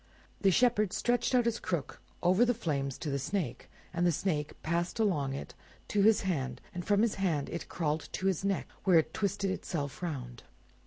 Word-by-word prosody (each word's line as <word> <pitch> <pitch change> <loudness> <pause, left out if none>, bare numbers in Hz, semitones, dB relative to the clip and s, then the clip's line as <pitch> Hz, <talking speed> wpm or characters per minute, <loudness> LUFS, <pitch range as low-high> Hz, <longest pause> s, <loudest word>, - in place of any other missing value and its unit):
The 195 - +5
Shepherd 215 -1 +3
stretched 245 +1 +1
out 245 -2 +4
his 235 -1 0
crook 170 -7 -3 0.2
over 185 +6 +5
the 245 0 +3
flames 140 - -2
to 155 - -3
the 140 - 0
Snake, 185 +4 -3 0.2
and 175 0 0
the 175 - +4
Snake 150 -3 -2
passed 170 +4 -1
along 145 -11 +1
it - - -7
on - - -26
to 205 - +2
his 220 +1 +5
hand, 135 -10 -2
and 180 -1 -4
from 205 +3 +3
his 230 - +2
hand 160 -7 +1
it 170 - -5
crawled 155 -2 -1
to 190 - -3
his 190 -2 +1
neck, 195 -1 0 0.2
where 185 -3 +6
it 160 - +2
twisted 200 -2 0
itself 150 -6 -4
round. 125 -9 -5
180 Hz, 200 wpm, -31 LUFS, 150-205 Hz, 0.2 s, where